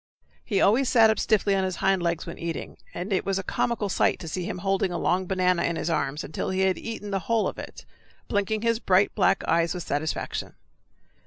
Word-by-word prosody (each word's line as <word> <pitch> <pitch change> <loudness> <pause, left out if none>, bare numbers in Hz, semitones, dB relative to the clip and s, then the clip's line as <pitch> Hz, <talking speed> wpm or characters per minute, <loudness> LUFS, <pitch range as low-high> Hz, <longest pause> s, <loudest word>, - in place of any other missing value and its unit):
He 200 -5 0
always 240 +6 +4
sat 225 -3 +6
up 220 - -1
stiffly 205 -2 +2
on 195 -1 +1
his 185 -1 -2
hind 190 -1 +1
legs 170 -1 -1
when - - -8
eating, 170 -1 -5
and 185 +4 -4
it 185 - +1
was 195 -1 -1
a 195 - -2
comical 230 +2 -1
sight 195 - +2
to 165 - -7
see 175 +3 -3
him - - -4
holding 195 0 0
a 175 - -2
long 185 +1 0
banana 180 -2 +2
in 170 - -1
his 165 +1 -2
arms, 150 -1 -1
until 155 - -4
he 190 0 0
had 190 -1 +2
eaten 215 -3 -6
the 195 - 0
whole 230 -1 +2
of - - -5
it, - - -9 0.4
blinking 210 +1 -1
his 230 -1 +2
bright 195 -2 +3
black 195 - +2
eyes 170 +1 +2
with 180 - -4
satisfaction. 150 +1 -3
190 Hz, 225 wpm, -26 LUFS, 175-205 Hz, 0.4 s, sat